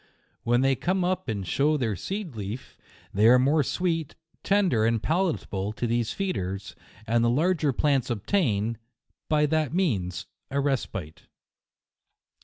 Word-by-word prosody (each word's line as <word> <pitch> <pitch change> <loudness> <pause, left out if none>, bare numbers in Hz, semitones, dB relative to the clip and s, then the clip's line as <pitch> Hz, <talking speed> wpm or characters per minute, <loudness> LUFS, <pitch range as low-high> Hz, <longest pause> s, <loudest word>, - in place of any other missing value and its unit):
When 120 +1 +2
they 135 0 +3
come 185 +7 0
up 185 -3 -1
and 100 -3 -2
show 150 - +2
their 115 -7 -1
seed 190 - -5
leaf, 105 +4 -6 0.4
they 105 +3 +4
are 125 +2 +8
more 140 +5 +3
sweet, 165 +1 -1 0.3
tender 190 - +2
and 115 0 +2
palatable 125 - -1
to 120 - -3
these 120 -1 0
feeders, 95 - -3 0.3
and 115 +1 +2
the 115 - +3
larger 155 +3 +2
plants 135 -1 +1
obtain, 115 - 0 0.5
by 150 -1 +3
that 155 -1 0
means, 95 - 0 0.2
a 140 - -1
respite. 115 - -3
130 Hz, 140 wpm, -26 LUFS, 110-160 Hz, 0.5 s, are